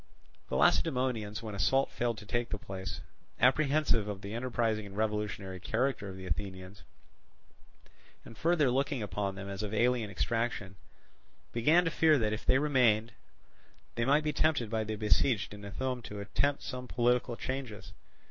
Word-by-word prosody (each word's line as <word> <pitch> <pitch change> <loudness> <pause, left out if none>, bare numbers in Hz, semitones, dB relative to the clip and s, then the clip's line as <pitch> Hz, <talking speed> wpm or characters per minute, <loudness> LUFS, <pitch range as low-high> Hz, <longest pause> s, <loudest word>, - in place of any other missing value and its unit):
The - - -2
Lacedaemonians, 125 -7 +1
when 110 -2 -5
assault 135 +8 +2
failed 120 -2 -1
to 105 - -9
take 120 +2 -1
the 105 - -2
place, 95 -2 -6 0.4
apprehensive 135 -3 +3
of 100 -2 -5
the 100 +1 -6
enterprising 115 -3 -1
and 100 0 -10
revolutionary 105 -3 -2
character 115 +1 -1
of 95 - -8
the 95 - -8
Athenians, 95 +2 -5 1.4
and 115 - -11
further 155 -2 +2
looking 135 -1 0
upon 100 -1 -2
them 100 0 -7
as 100 0 -5
of 105 0 -3
alien 120 -1 +2
extraction, 105 0 -2 0.8
began 155 +10 +4
to 165 - 0
fear 155 -1 +4
that, 110 -4 0
if 110 - -6
they 130 - +5
remained, 125 -6 +3 0.8
they 115 - -1
might 145 +5 +3
be 150 -1 0
tempted 145 -8 +1
by 110 -1 0
the 110 0 -3
besieged 105 +1 +1
in 105 0 -10
Ithome 125 +5 -3
to 105 - -7
attempt 140 +7 0
some 125 -1 -5
political 120 0 +1
changes. 130 -5 -5
115 Hz, 160 wpm, -31 LUFS, 105-130 Hz, 1.4 s, they